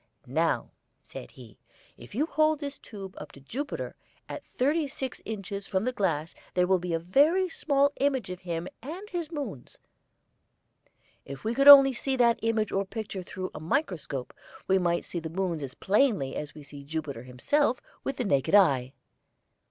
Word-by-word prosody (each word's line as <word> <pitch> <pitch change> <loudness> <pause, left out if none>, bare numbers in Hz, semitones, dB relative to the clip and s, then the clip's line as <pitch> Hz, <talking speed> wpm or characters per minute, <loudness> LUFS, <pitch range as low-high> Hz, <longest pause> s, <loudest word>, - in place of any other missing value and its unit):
"Now," - - 0 0.3
said - - -9
he, 120 -5 -15 0.4
"if 120 - -13
you 290 +6 +2
hold 310 -1 +2
this 285 -1 -6
tube 195 -3 -9
up 150 - -9
to - - -13
Jupiter, 265 - -5 0.3
at - - -7
thirty 295 +4 0
six 270 -2 -4
inches 200 -2 -5
from 190 +1 0
the 255 - 0
glass 170 -9 -1 0.2
there 180 0 +4
will 190 0 +3
be 175 -1 -2
a - - +2
very 290 - +3
small 285 -3 +2
image 265 -8 +1
of 180 - -6
him 175 -1 -4
and 340 - -7
his 340 -3 -3
moons. 265 - -6 1.5
If 140 0 -9
we 220 +2 0
could 275 +3 +2
only 275 -2 +11
see 265 +2 -1
that 235 -2 +3
image 225 -2 0
or 195 - +1
picture 200 -1 -5
through 185 +1 -6
a - - -7
microscope, 160 - -2 0.3
we 190 0 +4
might 170 -1 0
see 175 - -4
the 160 -1 -6
moons 175 -2 -2
as 130 -2 -6
plainly 200 - +2
as 150 0 -5
we 150 - -10
see 140 0 -11
Jupiter 145 -4 -4
himself 235 - +1 0.2
with 270 - -3
the - - -1
naked 140 - +2
eye." 135 -10 +4
195 Hz, 175 wpm, -28 LUFS, -, 1.5 s, only